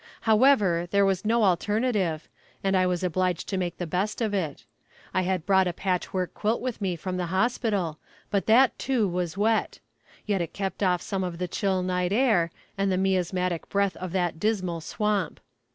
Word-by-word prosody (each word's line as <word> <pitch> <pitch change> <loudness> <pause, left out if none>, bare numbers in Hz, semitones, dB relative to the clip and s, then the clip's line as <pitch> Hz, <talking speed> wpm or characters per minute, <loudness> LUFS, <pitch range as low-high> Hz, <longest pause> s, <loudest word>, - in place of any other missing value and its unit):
However, 215 -7 +4
there 200 +1 +3
was 190 -1 +1
no 230 +1 +3
alternative, 200 -3 +1 0.4
and 195 0 +2
I 185 -1 +3
was 180 0 -1
obliged 180 -1 0
to 195 - -1
make 175 -2 -2
the 175 - -3
best 190 +6 -2
of 220 -3 -1
it. 165 -8 -3 0.5
I 185 - +2
had 185 -2 -1
brought 190 -2 +4
a 175 - -1
patch 185 0 -2
work 185 -2 -2
quilt 220 +2 0
with 250 -4 -4
me 185 -3 0
from 180 +2 -4
the 180 -1 -2
hospital, 190 -4 0 0.3
but 200 -1 0
that, 245 +4 +5
too, 245 -5 +1
was 180 -1 -3
wet. 220 +2 +1 0.5
Yet 200 -3 0
it 170 - -4
kept 195 0 -4
off 180 -3 +2
some 195 -1 -2
of 175 -2 -4
the 180 +1 -2
chill 190 0 0
night 180 0 0
air, 210 -7 +3 0.3
and 195 0 +2
the 185 - +1
miasmatic 180 -2 0
breath 200 -1 +1
of 185 -1 -5
that 175 -3 -1
"dismal 185 -5 -1
swamp." 205 0 -1
190 Hz, 190 wpm, -26 LUFS, 180-210 Hz, 0.5 s, that